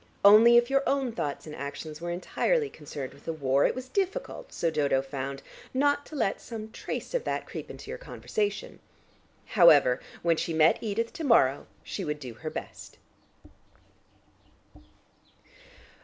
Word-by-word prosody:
Only, 225 +4 +9
if 240 +2 +3
your 275 0 +4
own 270 -3 +1
thoughts 145 -10 -4
and 155 -1 -8
actions 150 +3 -7
were 175 - -4
entirely 430 - 0
concerned 145 -3 -7
with 140 - -19
the - - -1
war, 140 -2 +2
it - - -2
was 255 0 -6
difficult, 395 - -3
so 165 - -1
Dodo 145 -3 +2
found, 135 0 -5 0.3
not 285 +1 +2
to 310 - -10
let 225 -8 0
some 220 -2 -7
trace - - -6
of - - 0
that - - -2
creep - - -8
into 430 - -9
your - - -6
conversation. 450 -1 -3 0.7
However, 145 -10 +6 0.2
when 170 -1 +3
she 165 - -2
met 160 0 +5
Edith 230 +1 -2
to 330 - -6
morrow, 145 - +3 0.2
she - - -5
would 150 0 -3
do 125 -5 -7
her 155 +8 -6
best. - - -8
180 Hz, 155 wpm, -28 LUFS, -, 0.7 s, Only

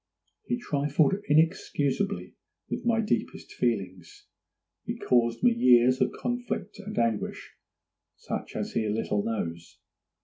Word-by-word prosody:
He 245 - 0
trifled 145 - +1 0.2
inexcusably 160 +4 +1 0.4
with - - -3
my 225 -1 +3
deepest 215 - -2
feelings; 95 -8 -3 0.6
he - - -4
caused 120 -2 +1
me 245 - +6
years 125 - +5
of - - +3
conflict 230 -5 -4
and 210 +1 -7
anguish, 115 -2 -1 0.6
such - - -6
as - - -3
he 110 -1 0
little 105 -1 0
knows. 85 -7 -4
135 Hz, 115 wpm, -28 LUFS, -, 0.6 s, me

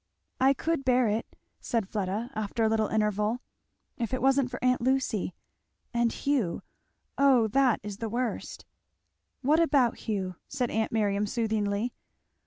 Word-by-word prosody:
"I 270 +1 +5
could 325 -2 -1
bear 255 -2 +3
it," 220 +2 -3 0.2
said 230 -6 -1
Fleda 210 +4 -3
after 215 0 -2
a - - +4
little 220 -1 +2
interval, 210 +1 +1 0.6
"if 235 +1 -1
it - - -4
wasn't 270 -1 +3
for 250 - -5
aunt 250 -1 +3
Lucy 250 -8 0 0.6
and 235 -1 +2
Hugh 260 -12 -1 0.6
oh 265 -5 +5
that 260 +1 +3
is 205 -1 -6
the 225 0 -4
worst! 240 +1 -3 0.4
" - - -51
"What 300 +5 +4
about 280 -8 +3
Hugh?" 190 -5 -3
said 255 -3 -2
aunt 220 0 0
Miriam, 205 -2 +1
soothingly. 220 0 -1
230 Hz, 150 wpm, -28 LUFS, 210-255 Hz, 0.6 s, I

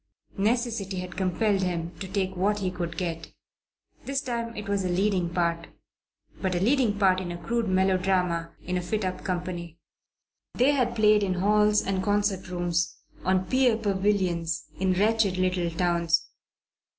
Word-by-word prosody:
Necessity 220 -3 0
had 180 0 -5
compelled 190 +2 +1
him 170 -2 -2
to 195 - -5
take 190 -1 -2
what 200 +3 +1
he 190 -3 -2
could 175 -2 -5
get. 165 -3 -4 0.7
This 275 0 -1
time 235 -4 -4
it 210 0 -6
was 200 -1 0
a 185 - -1
leading 185 -1 +1
part; 170 -1 -1 0.7
but 185 -2 0
a - - +1
leading 230 0 +2
part 190 -2 +4
in 175 -2 -5
a 175 - -5
crude 230 +5 -1
melodrama 185 -2 +1
in 180 +1 -1
a - - -1
fit 210 +3 -2
up 185 0 -4
company. 175 -2 -4 0.8
They 255 +4 +4
had 250 -4 +1
played 215 -1 +5
in 190 -2 0
halls 210 +2 +3
and 190 -1 0
concert 205 -2 0
rooms, 175 -2 -1 0.3
on 185 0 +2
pier 255 -2 +3
pavilions, 190 -6 0 0.2
in 190 0 +2
wretched 205 0 +2
little 180 -2 +1
towns. 170 -1 +1
190 Hz, 160 wpm, -27 LUFS, 180-210 Hz, 0.8 s, played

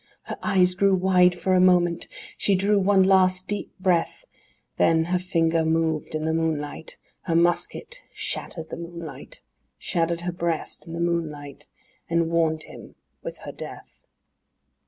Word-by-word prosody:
Her - - -6
eyes 185 -3 +3
grew 195 +1 +3
wide 180 -1 +4
for 185 +1 0
a 185 - +5
moment; 175 -2 +3 0.3
she 200 - +1
drew 200 +2 +2
one 195 0 +4
last 185 -1 +3
deep 205 0 -3
breath, 185 - 0 0.5
Then 160 0 +4
her 180 +2 0
finger 165 -3 +1
moved 160 -1 0
in 155 0 -2
the 160 - +1
moonlight, 160 -1 -3 0.3
Her 170 -3 0
musket 175 - +1
shattered 160 -2 -5
the - - -5
moonlight, 170 -2 -9 0.3
Shattered 170 0 -1
her 175 +1 -2
breast 170 -2 -3
in 165 - -7
the 170 - -4
moonlight 150 -4 -3 0.4
and 170 0 +1
warned 160 -2 +1
him—with - - -11
her - - -5
death. - - -11
170 Hz, 145 wpm, -24 LUFS, 165-185 Hz, 0.5 s, a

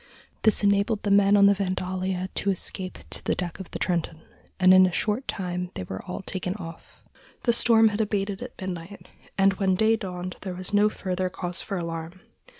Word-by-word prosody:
This 215 -1 +5
enabled 200 +2 +2
the 205 - 0
men 200 0 +5
on 200 - +6
the 200 - +6
Vandalia 185 -1 -2
to 200 - 0
escape 185 0 -1
to - - +1
the - - 0
deck 180 -1 -4
of 190 - -8
the - - -5
Trenton, 170 -3 -2 0.4
and 185 0 +7
in 185 0 +7
a - - -2
short 215 +8 0
time 180 -1 -3
they - - -4
were 95 +1 -6
all 180 - -6
taken 185 0 -3
off. 165 -5 -11 0.4
The 235 - +3
storm 225 -1 +5
had 210 +1 -2
abated 200 -2 -2
at 250 0 -9
midnight, 185 0 -7 0.3
and 195 0 +4
when 190 -2 +2
day 220 +3 +3
dawned 185 -3 -6
there 185 -2 -5
was 185 +2 -5
no 205 +1 +4
further 185 -2 -3
cause 180 -1 -5
for 195 - -4
alarm. 165 +1 -5
190 Hz, 200 wpm, -25 LUFS, 180-205 Hz, 0.4 s, and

